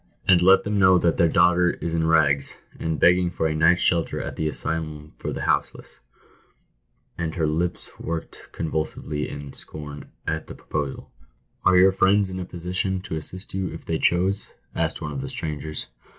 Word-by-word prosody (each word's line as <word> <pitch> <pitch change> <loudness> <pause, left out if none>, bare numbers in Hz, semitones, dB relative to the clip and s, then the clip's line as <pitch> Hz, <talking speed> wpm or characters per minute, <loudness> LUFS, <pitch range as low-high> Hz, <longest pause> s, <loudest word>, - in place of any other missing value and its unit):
" - - -31
And 90 -2 +6
let 95 +2 +6
them 105 0 0
know 95 -1 +6
that 85 -2 +2
their 85 - +4
daughter 90 +1 +4
is 85 - -4
in 80 -1 +1
rags, 70 -4 +2 0.2
and 80 -1 -2
beg 90 +1 +6
ging 90 -1 +1
for 85 -2 -2
a 80 - +1
night's 80 +3 +4
shelter 85 -2 +1
at - - -5
the 80 - -1
asylum 75 -1 -4
for - - -3
the - - -4
houseless - - -1
I" - - -19
And 80 - -4
her 80 -3 +1
lips 85 +3 -1
worked 85 0 -6
convulsively 80 -1 -3
in 70 -1 -8
scorn 75 -1 -9 0.2
at 80 0 -2
the - - -8
proposal. 75 -3 -4 0.5
"Are 95 -1 +5
your 95 +1 +7
friends 95 +1 +3
in 95 - -4
a 90 - -4
position 90 +2 -3
to 90 - -5
assist 90 +4 -7
you 95 -1 -1
if 80 - -9
they 80 -1 -1
chose?" 95 +3 +1 0.2
asked" 80 0 -2
one 75 - -3
of 70 -2 -4
the 70 - -5
strangers. 75 0 -4
80 Hz, 195 wpm, -24 LUFS, 75-90 Hz, 0.5 s, your